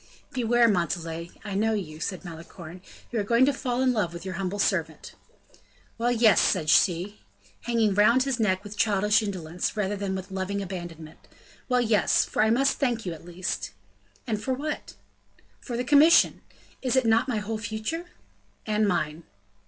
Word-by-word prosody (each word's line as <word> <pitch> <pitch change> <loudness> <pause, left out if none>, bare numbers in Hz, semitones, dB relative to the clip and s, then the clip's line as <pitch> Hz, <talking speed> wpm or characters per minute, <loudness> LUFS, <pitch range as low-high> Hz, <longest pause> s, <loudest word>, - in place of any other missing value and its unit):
"Beware, 240 -2 +3
Montalais, 170 -3 -1 0.2
I 205 - -5
know 220 +3 +1
you," 155 -7 -5
said 185 +3 -4
Malicorne; 170 +1 -10 0.3
"you 235 - -1
are - - 0
going 235 +5 +4
to 285 - +2
fall 255 -1 -1
in 255 -1 +3
love 205 -7 -1
with 170 +2 -8
your 185 - -4
humble 190 +1 -3
servant." 200 - -1 0.9
"Well, 240 +1 +1
yes!" 225 -5 +5
said 155 -4 +2
she, 185 +4 +2 0.4
hanging 230 -4 +2
round 215 +6 +4
his 265 -3 -2
neck 190 -3 +1
with 205 0 -9
childish 210 0 +2
indolence, 180 -2 -4
rather 205 0 0
than 195 -1 -3
with 190 +1 -7
loving 190 +1 -3
abandonment. 175 -5 -7 0.5
"Well, 250 -1 +3
yes! 220 -3 +3
for - - -1
I 220 - +4
must 270 +4 +2
thank 240 -6 0
you 175 - -3
at 165 - -12
least." 175 +1 -4 0.5
"And 215 -4 -2
for 260 - -1
what?" 300 +3 -5 0.6
"For 240 -2 -5
the 245 - -1
commission; 295 +5 +5 0.4
is 255 -1 0
it 260 -2 +3
not 225 +3 +3
my 235 - 0
whole 215 +1 -3
future?" 225 +10 -4 0.6
"And 215 0 +1
mine." 155 -4 -1
210 Hz, 175 wpm, -26 LUFS, 185-235 Hz, 0.9 s, yes